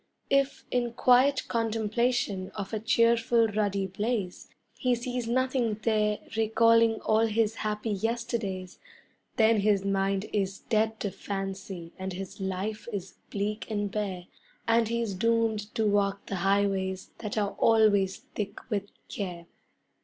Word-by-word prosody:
If 275 0 +2
in 240 -1 0
quiet 255 +3 +4
contemplation 225 -3 0
of 200 +1 -5
a 220 - 0
cheerful 230 +1 +3
ruddy 200 -2 0
blaze 200 0 -3 0.2
He 250 -3 +1
sees 245 0 -3
nothing 255 -2 +1
there 210 -2 +2 0.2
recalling 230 +1 +4
all 220 +1 +3
his 220 0 +1
happy 210 +1 -2
yesterdays, 215 -3 -3 0.6
Then 220 -1 +4
his 200 -1 +2
mind 195 0 +1
is 195 -2 0
dead 220 0 0
to 200 - -1
fancy 195 -4 -5
and 190 0 -4
his 190 +2 -7
life 195 +4 -3
is 195 -3 -5 0.2
bleak 210 +2 -3
and 205 -2 -1
bare, 195 -4 -3 0.4
And 230 0 +4
he's 230 -2 -1
doomed 220 0 +1
to 220 - +1
walk 200 -1 +1
the 195 - -3
highways 195 0 0
that 210 -1 -4
are 205 -1 +1
always 205 -4 +4
thick 205 +3 -7
with 200 -1 -1 0.2
care. 180 -4 -5
210 Hz, 135 wpm, -28 LUFS, 195-230 Hz, 0.6 s, quiet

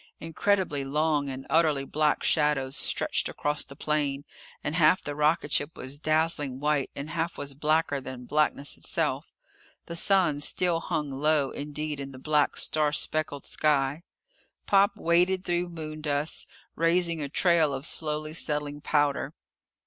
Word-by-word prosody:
Incredibly 165 -2 0
long 150 0 0
and 135 0 -7
utterly 155 -4 +2
black 150 +1 +1
shadows 150 -4 +1
stretched - - +1
across 150 0 -2
the 140 - -13
plain, 145 -2 -1 0.4
and 150 - -2
half 165 +2 +4
the 145 - -5
rocketship 150 0 0
was 130 +3 -5
dazzling 155 -4 0
white 145 -1 0
and 140 +2 -6
half 165 +1 -2
was 140 -1 -4
blacker 150 0 +1
than 130 -1 -8
blackness 150 0 0
itself. - - -2 0.5
The 170 - -6
sun 170 -4 +3
still 170 +3 +3
hung 150 -3 -3
low 145 0 +1
indeed 150 0 -4
in 135 -1 -7
the - - -10
black, 150 +2 +1
star 150 -1 +2
speckled 150 -1 -1
sky. 145 0 +1 0.6
Pop 200 0 +3
waded 180 +3 +2
through 175 0 0
moondust, 155 -2 -3 0.3
raising 170 -1 +1
a 140 - -4
trail 165 -1 +3
of 135 +1 -3
slowly 155 -1 0
settling 150 -2 -3
powder. 145 -1 0
150 Hz, 140 wpm, -27 LUFS, 145-160 Hz, 0.6 s, half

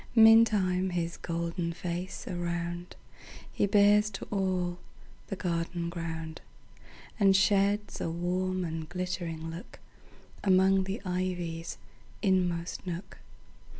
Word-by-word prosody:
Meantime 215 -5 +6
his 170 -1 -2
golden 170 0 -2
face 175 +2 -5
aroundHe 175 0 -3 0.7
bears 210 +1 +5
to 195 - -7
all 185 -3 0 0.5
the 195 - -3
garden 170 -1 -2
ground, 165 -2 -5 0.8
And 195 -2 +5
sheds 200 +2 +2
a - - -1
warm 180 +2 -1
and 160 -1 -5
glittering 175 -3 -4 0.9
lookAmong 190 0 +4
the 195 +2 -4
ivy's 180 -2 -3 0.5
inmost 180 -3 0
nook. 180 +2 -6
180 Hz, 95 wpm, -30 LUFS, 170-190 Hz, 0.9 s, Meantime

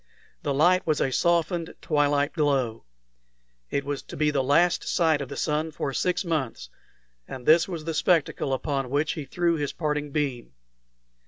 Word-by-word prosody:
The 145 - -2
light 175 +7 +3
was 155 -2 +2
a 135 - +1
softened 170 +2 0
twilight 145 -2 +1
glow. 135 -8 0 0.8
It 140 - -1
was 145 -1 -3
to - - -10
be 150 0 +2
the 140 -2 +1
last 170 +6 +3
sight 160 -4 +2
of 135 - -5
the - - -7
sun 155 +1 0
for 140 -2 -3
six 180 +6 0
months, 135 - -3 0.6
and 130 -2 -8
this 165 +2 +5
was 170 -5 -6
the 165 - -2
spectacle 160 -3 +1
upon 135 -1 -2
which 145 +4 +1
he 155 -4 -5
threw 170 +4 0
his 145 -2 -3
parting 150 -2 -2
beam. 140 - -3
150 Hz, 170 wpm, -26 LUFS, 140-165 Hz, 0.8 s, this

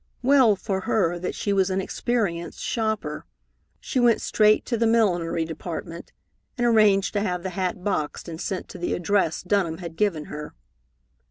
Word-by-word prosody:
Well 260 -5 +5
for 190 0 -3
her 175 -6 +1
that 180 - -4
she 200 - -1
was 195 -1 +2
an 190 0 0
experienced 190 -4 -2
shopper. 220 -9 -2 0.5
She 260 - -2
went 240 -2 +4
straight 215 0 +3
to 240 - -1
the 230 0 +2
millinery 175 -8 +2
department 165 +1 -7 0.5
and 240 - +1
arranged 215 -4 +4
to 205 - 0
have 180 -4 -2
the 190 - -3
hat 180 0 -3
boxed 180 -7 -2
and 165 -1 -6
sent 190 - -3
to - - -9
the 175 - -1
address 175 -2 0
Dunham 180 -4 0
had 170 -2 -8
given 170 -6 0
her. 150 - -8
190 Hz, 170 wpm, -24 LUFS, 170-215 Hz, 0.5 s, Well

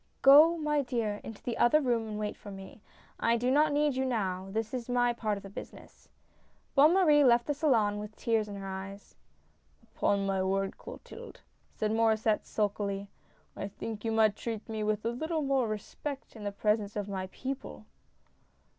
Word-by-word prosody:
" - - -41
Go, 305 +5 +8
my 300 -2 +1
dear, 230 -6 -2
into 225 - -9
the 240 - -3
other 270 +6 +5
room 240 -5 0
and 210 -1 -5
wait 210 -1 -3
for 205 - -12
me. 195 +2 -10 0.4
I 235 +1 +2
do 245 +2 0
not 300 +2 +4
need 290 -1 +2
you 260 - 0
now, 195 -7 -2
this 220 +3 -3
is 250 -1 -4
my 245 -1 +2
part 215 -3 -2
of 200 - -10
the 195 - -9
business." - - -11 0.6
Bonne 300 +5 +6
Marie 305 -6 +5
left 240 -2 +4
the 295 - 0
salon 230 -9 +2
with 210 +1 -8
tears 225 -2 0
in 205 - -7
her 195 -1 -7
eyes. 195 +1 -7 0.4
" - - -38
Upon 200 -1 0
my 195 -1 0
word, 195 +1 -1
Clotilde," - - -11 0.3
said 215 0 -1
Maur^sset, 220 -1 +2
sulkily, 200 -1 -2 0.2
" - - -37
I - - -4
think 210 +1 -7
you 225 - -1
might 220 -2 +3
treat 225 -2 -5
me 220 -1 -3
with 215 0 -1
a 230 - +1
little 315 +5 -2
more 270 -3 +1
respect 255 +7 -6
in 215 -2 -8
the 205 - -1
presence 210 0 0
of 205 -1 -3
my 190 -2 -4
people 265 +7 -6
220 Hz, 195 wpm, -30 LUFS, 205-260 Hz, 0.6 s, Go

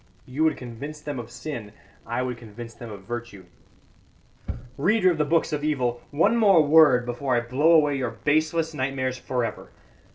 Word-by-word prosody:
You 135 +5 -2
would 155 -2 +2
convince 135 +5 -8
them 145 -3 -5
of 115 -1 -8
sin, 120 -4 -7 0.3
I 120 +2 -1
would 125 -1 -3
convince 115 +1 -10
them 115 -1 -10
of 100 -2 -10
virtue. 120 -3 -7 1.3
"Reader 185 +5 +3
of 165 - -3
the 150 - +2
books 165 +1 +1
of 145 -1 -2
evil, 125 -6 -1
one 170 +10 +2
more 195 -8 +5
word 145 -5 +6
before 125 +2 -1
I 120 - +2
blow 135 +8 +2
away 150 -3 +4
your 125 -2 -1
baseless 155 +6 0
nightmares 130 -2 -2
for 125 -2 -1
ever. - - -7
130 Hz, 175 wpm, -25 LUFS, 120-155 Hz, 1.3 s, word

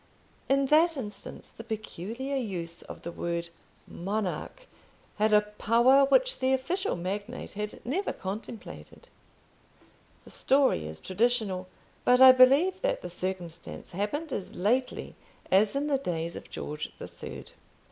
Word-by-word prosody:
In 275 0 +3
that 320 +3 +4
instance 210 -6 -7
the 225 - -11
peculiar 225 +4 -5
use 175 -9 -4
of - - -10
the 170 - -5
word 170 0 -3 0.4
Monarch 200 - -4 0.5
had 215 +1 +2
a 210 0 +7
power 235 +6 +4
which - - +3
the 260 +1 +2
official 345 +10 -1
magnate 200 +7 -5
had 210 +1 -6
never 345 +12 -1
contemplated. 220 - -8 1.1
The - - -15
story 265 - +2
is 80 0 -7
traditional; 205 -3 0 0.4
but 250 0 +5
I 260 0 +11
believe 275 +9 +5
that - - 0
the 180 - -5
circumstance 180 -2 -5
happened 260 - -3
as 190 - -5
lately 245 +8 0 0.4
as 200 +5 +4
in 280 +1 0
the 285 -2 +1
days 170 -8 -3
of - - -9
George 150 0 -5
the - - -7
Third. - - -9
220 Hz, 135 wpm, -28 LUFS, 185-270 Hz, 1.1 s, I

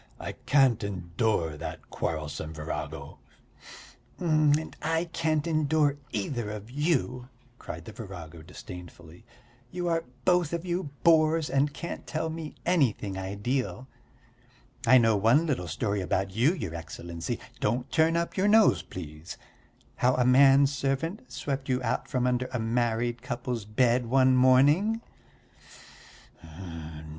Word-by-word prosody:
I - - -5 0.2
can't 135 -6 +4
endure 90 -3 -1
that 80 - -8
quarrelsome 80 0 -4
virago." 75 +1 -6 1.0
"And 155 -2 +2
I 165 +1 0
can't 155 -3 -1
endure 155 -2 +2
either 110 +1 -2
of 105 +2 -7
you," 130 -4 -1 0.3
cried 85 0 -8
the - - -8
virago 90 -7 -9
disdainfully. 90 +3 -11 0.4
"You 175 +3 -3
are 165 -1 +1 0.2
both 175 -3 +3
of 170 +1 -3
you 175 -3 -2
bores 160 -1 +4
and 140 +1 +2
can't 170 - -7
tell 160 0 -2
me 160 -1 -6
anything 125 - +1
ideal. 105 +8 -3 1.0
I 130 +3 +8
know 115 -3 +4
one 115 +10 +4
little 130 - -1
story 100 +5 -1
about 95 +1 -1
you, 120 - +3
your 85 - -5
Excellency 85 0 -5 0.2
don't 120 +4 -1
turn 165 0 +3
up 170 0 -2
your 190 +2 +2
nose, 215 +1 +5
please 75 -2 -9 0.6
how 125 +1 +3
a 125 - +2
man 135 +2 +6
servant 140 - -2
swept 135 -1 -4
you 125 -1 +2
out 125 +3 -1
from 125 -3 0
under 125 0 0
a 125 - -1
married 120 +1 0
couple's 120 -4 -4
bed 120 +2 +2
one 130 +1 +4
morning." 145 - +4
125 Hz, 130 wpm, -28 LUFS, 105-155 Hz, 1.0 s, I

